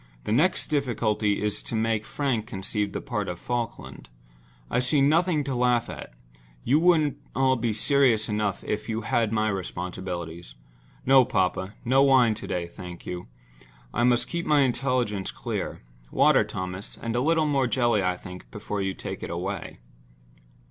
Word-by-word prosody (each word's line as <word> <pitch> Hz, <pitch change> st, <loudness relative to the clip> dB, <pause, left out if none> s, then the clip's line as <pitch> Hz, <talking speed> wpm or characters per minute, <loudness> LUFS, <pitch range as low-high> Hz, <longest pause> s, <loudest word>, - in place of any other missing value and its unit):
"The -, -, -3 dB
next 155 Hz, +12 st, +2 dB
difficulty 110 Hz, -8 st, 0 dB
is 105 Hz, -1 st, -1 dB
to -, -, -6 dB
make 110 Hz, -1 st, 0 dB
Frank 125 Hz, -7 st, -1 dB
conceive 105 Hz, 0 st, -2 dB
the -, -, -4 dB
part 105 Hz, -5 st, -3 dB
of 90 Hz, -, -4 dB
Falkland. 120 Hz, -, -5 dB, 0.6 s
I 125 Hz, -, 0 dB
see 125 Hz, +4 st, +2 dB
nothing 155 Hz, +2 st, +3 dB
to 140 Hz, -1 st, -3 dB
laugh 125 Hz, -1 st, +1 dB
at—you -, -, -4 dB
would 160 Hz, -4 st, +3 dB, 0.2 s
all 130 Hz, 0 st, +3 dB
be 115 Hz, -2 st, -1 dB
serious 115 Hz, -1 st, +3 dB
enough 105 Hz, -2 st, -1 dB
if 105 Hz, +2 st, -3 dB
you 110 Hz, 0 st, -1 dB
had 115 Hz, 0 st, +1 dB
my 110 Hz, -1 st, +1 dB
responsibilities. 90 Hz, -, -5 dB, 0.5 s
No, 135 Hz, 0 st, +7 dB
papa—no 100 Hz, +5 st, +1 dB
wine 130 Hz, -5 st, +5 dB
to 110 Hz, -, -7 dB
day, 85 Hz, -1 st, -2 dB
thank 85 Hz, 0 st, -10 dB
you. 90 Hz, 0 st, -6 dB, 0.7 s
I 120 Hz, -, +1 dB
must 120 Hz, 0 st, +3 dB
keep 170 Hz, 0 st, -3 dB
my 150 Hz, -1 st, +5 dB
intelligence 125 Hz, -6 st, 0 dB
clear. -, -, -4 dB, 0.3 s
Water, -, -, +4 dB
Thomas—and 95 Hz, +5 st, -5 dB
a 120 Hz, -, +2 dB
little 160 Hz, +2 st, +3 dB
more 140 Hz, -3 st, +2 dB
jelly, 120 Hz, -4 st, +2 dB
I 90 Hz, -1 st, 0 dB
think, 90 Hz, 0 st, -10 dB
before 105 Hz, -1 st, -4 dB
you 95 Hz, 0 st, -2 dB
take -, -, -6 dB
it -, -, -5 dB
away." -, -, -5 dB
115 Hz, 155 wpm, -26 LUFS, 95-130 Hz, 0.7 s, No